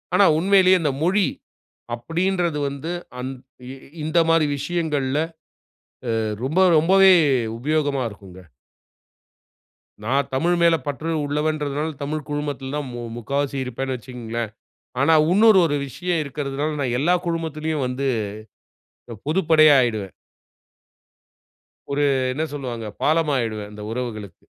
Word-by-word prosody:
ஆனா 200 - +6
உண்மையிலேயே 185 0 +5
இந்த 150 -3 +1
மொழி 190 +3 +3 0.7
அப்படின்றது 170 +4 -1
வந்து 140 +4 -6 0.3
அந் 130 +1 -4 0.4
இ - - -7 0.3
இந்த 160 +2 +2
மாதிரி 165 -2 +4
விஷயங்கள்ல, 145 -3 -1 1.0
அ - - +1 0.3
ரொம்ப 165 +7 +1 0.2
ரொம்பவே 190 +4 +6 0.5
உபயோகமா 145 0 0
இருக்குங்க. 95 -2 -13 1.6
நான் 135 +5 +1
தமிழ் 170 +6 +2
மேல 170 -1 +5
பற்று 155 +4 -3
உள்ளவன்றதனால, 150 0 -1
தமிழ் 150 +1 -4
குழுமத்துல 145 -2 -4
தான் 150 -2 -3
மு 120 - -6 0.2
முக்காவாசி 140 +4 -2
இருப்பேன்னு 130 +1 -3
வச்சுகங்களேன். 120 -2 -5 0.5
ஆனா 145 +4 +4 0.2
இன்னொரு 215 -1 +6
ஒரு 145 -3 0
விஷயம் 175 +3 -2
இருக்கிறதனால, 140 +1 -3
நான் 125 -3 -1
எல்லா 175 +4 +3
குழுமத்திலேயும் 160 -3 -2
வந்து 130 +2 -2 1.1
அ - - -6
பொதுப்படையா 155 -3 +5
ஆயிடுவேன். 110 -6 -1 1.8
ஒரு 145 +1 +1 0.3
என்ன 155 - -2
சொல்லுவாங்க? 120 -6 -5 0.2
பாலம் 160 0 +2
ஆயிடுவேன், 110 -4 -2
அந்த 105 - -10
உறவுகளுக்கு. 110 -7 -6
145 Hz, 115 wpm, -22 LUFS, 130-165 Hz, 1.8 s, ஆனா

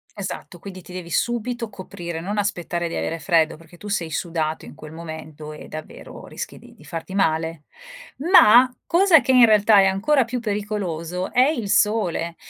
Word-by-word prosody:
Esatto 190 -2 -7
quindi 185 0 -10
ti 180 - -13
devi 180 -2 -7
subito 240 +1 -2
coprire, 175 -4 -7
non 205 +4 -4
aspettare 175 -3 -2
di 165 - -7
avere 165 -1 -3
freddo, 165 -4 +2
perché 165 +2 -17
tu 205 - -12
sei 175 -6 -2
sudato 160 -1 -3
in - - -11
quel 155 - -11
momento 155 -2 -9
e 150 - -11
davvero 155 0 -10
rischi - - -7
di - - -17
di - - -19
farti 165 +3 -7
male. 160 -4 0 0.5
Ma, 260 - +7 0.2
cosa 345 -3 +5
che - - -3
in 250 -2 +7
realtà 210 -1 +5
è 195 - +4
ancora 230 +8 +2
più 245 +1 -4
pericoloso 195 -5 -3
è 255 +1 +5
il 235 -10 -2
sole 175 -6 +1
185 Hz, 180 wpm, -22 LUFS, 165-215 Hz, 0.5 s, Ma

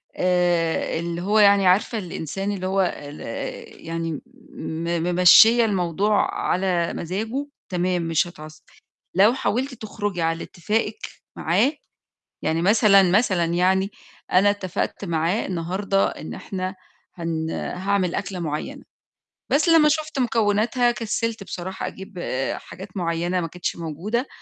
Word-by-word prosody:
آآ 175 -3 +1
اللي 170 0 -4
هو 210 +3 +2
يعني 200 -2 +6
عارفة 205 +5 +3
الإنسان 195 +1 -4
اللي 185 -2 -3
هو 195 +1 +1 0.2
ال 145 +1 -10 0.7
يعني 165 -2 -3 0.3
م 170 -6 -3
ممشّية 180 +7 +7
الموضوع 195 +1 +1
على 180 -2 0
مزاجه، 220 - -3 0.2
تمام 180 0 0
مش 165 +2 +1
هيتعصّب، 155 -2 -12 0.5
لو 205 +5 +6
حاولتِ 265 +1 -1
تخرجي 205 -5 -4
على 165 0 0
اتفاقِك 210 - -2 0.4
معاه 280 - +2 0.7
يعني 160 +1 0
مثلًا، 200 +1 +5
مثلًا 190 -4 +3
يعني 185 +4 +1 0.4
أنا 195 +3 +5
اتفقت 200 0 -3
معاه 170 +4 0
النهارده 190 +3 0
إن - - -8
إحنا 185 0 -5 0.4
هن 165 -2 -3
هاعمل 190 -1 -1
أكلة 195 -2 -4
معيّنة، 155 -3 -4 0.7
بس 305 +5 +2
لمّا 325 -2 +6
شُفت 310 -1 -1
مكوناتها 235 +1 +2
كسّلت 230 -2 -2
بصراحة 190 +1 -5
أجيب 190 0 -9 0.4
حاجات 185 +3 -11
معيّنة 175 0 -1
ما 165 - -2
كانتش 180 +2 -4
موجودة، 175 - -3
185 Hz, 125 wpm, -23 LUFS, 170-210 Hz, 0.7 s, ممشّية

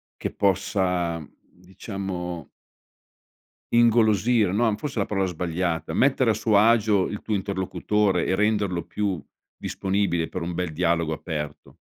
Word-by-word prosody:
che - - -4
possa 90 -5 0
diciamo 90 - -7 1.2
ingolosire, 115 -2 +4
no 110 +1 +2
forse 140 +3 -6
è - - +2
la 100 - +1
parola 95 -2 0
sbagliata, 85 -2 -2
mettere 130 +2 +3
a - - +2
suo 110 0 +2
agio 110 -2 +4
il 105 - -6
tuo 105 - -2
interlocutore 95 0 0
e 95 - +1
renderlo 100 -4 +1
più 100 -7 -2 0.3
disponibile 95 -4 -1
per - - -5
un 85 +1 -3
bel 85 -2 -3
dialogo 85 -1 +1
aperto. 75 -2 -6
95 Hz, 130 wpm, -25 LUFS, 85-105 Hz, 1.2 s, ingolosire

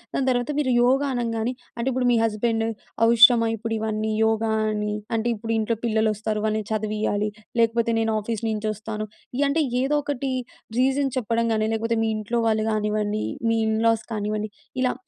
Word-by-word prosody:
దాని 265 - 0
తర్వాత 245 +3 0
మీరు 260 -4 +1
యోగా 270 +3 +3
అనంగానే 230 0 -1 0.2
అంటే, 235 +3 -2
ఇప్పుడు 250 0 0
మీ 235 - +4
హస్బెండు 225 +1 0 0.4
అవసరమా 235 0 +7
ఇప్పుడివన్నీ 220 -1 -2
యోగా 220 0 +1 0.2
అని? 210 0 -2 0.2
అంటే, 225 +1 0
ఇప్పుడు 225 +2 -5
ఇంట్లో 220 +1 0
పిల్లలొస్తారు, 215 -1 0
వాళ్ళని 215 -1 -1
చదివియ్యాలి, 210 -1 -1 0.3
లేకపోతే 230 0 +2
నేను 225 0 +1
ఆఫీస్ 225 +1 -4
నించొస్తాను, 215 0 -3 0.4
యంటే, 290 +3 +2 0.2
ఏదోకటి 280 -1 -1 0.5
రీజన్ 270 +1 +2
చెప్పడం 230 0 0
గానీ, 215 0 +1
లేకపోతే 230 +1 0
మీ 225 - +1
ఇంట్లో 215 +3 -2
వాళ్ళు 220 0 +1
గానివ్వండి, 210 0 -1 0.2
మీ 230 0 +2
ఇన్ 220 0 +1
లాస్ 225 -1 +2
కానివ్వండి, 210 0 -2 0.3
ఇలా 255 - +2
225 Hz, 150 wpm, -24 LUFS, 215-235 Hz, 0.5 s, అవసరమా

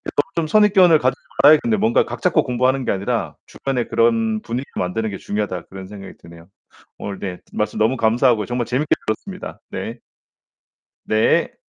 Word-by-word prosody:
좀 195 -4 0
좀 - - -2
선입견을 190 -3 +5
가지지 130 -2 0 0.2
말아야겠는데 185 +10 +5
뭔가 220 +3 +3
'각 - - -7
잡고 180 -3 +3
공부하는 130 +1 0
게 - - +1
아니라 100 0 -2
주변에 130 -3 -3
그런 115 -2 +1
분위기 120 +4 -4
만드는 110 +5 -2
게 100 - -6
중요하다.' 100 -4 -3
그런 95 0 -9
생각이 100 -1 -10
드네요. 85 0 -15 0.5
오늘 100 -1 -6
네, 90 -3 -5
말씀 105 - -2
너무 115 +5 +2
감사하고요. 115 -1 +2
정말 120 0 -2
재밌게 130 +6 -1 0.2
들었습니다. 185 - -5
네. - - -5 1.1
네. - - +2
120 Hz, 390 characters per minute, -20 LUFS, 105-150 Hz, 1.1 s, 선입견을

